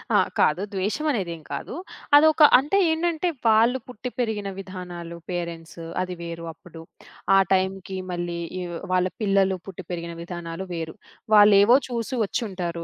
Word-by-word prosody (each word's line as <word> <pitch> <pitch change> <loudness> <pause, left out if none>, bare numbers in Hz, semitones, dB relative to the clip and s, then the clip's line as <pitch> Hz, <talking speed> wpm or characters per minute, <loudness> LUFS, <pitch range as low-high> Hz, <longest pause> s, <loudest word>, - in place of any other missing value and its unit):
ఆ! - - +7 0.2
కాదు. 155 +5 +3
ద్వేషమనేదేం 195 - -1
కాదు. - - -5 0.4
అదొక 315 +2 +5 0.2
అంటే 295 +9 0
ఏంటంటే, 335 +1 0 0.2
వాళ్ళు 230 +4 +4
పుట్టి 250 0 -6
పెరిగిన 215 -4 -1
విధానాలు, 180 -3 -7
పేరెంట్స్ 170 -1 -5 0.2
అది 180 0 -5
వేరు 170 0 -6
అప్పుడు. 165 0 -13 0.6
ఆ - - +7
టైం‌కి 190 0 -1
మళ్ళీ 175 -1 -3 0.2
ఇవ్ 175 -1 -5 0.2
వాళ్ళ 185 0 +3 0.2
పిల్లలు 195 -2 +3
పుట్టి 190 -1 -8
పెరిగిన 170 -1 -4
విధానాలు 170 +1 -6
వేరు. 165 -1 -5 0.4
వాళ్ళేవో 205 +3 +7
చూసి 240 +1 -3
ఒచ్చుంటారు 180 -7 -3
190 Hz, 130 wpm, -24 LUFS, 170-220 Hz, 0.6 s, ఆ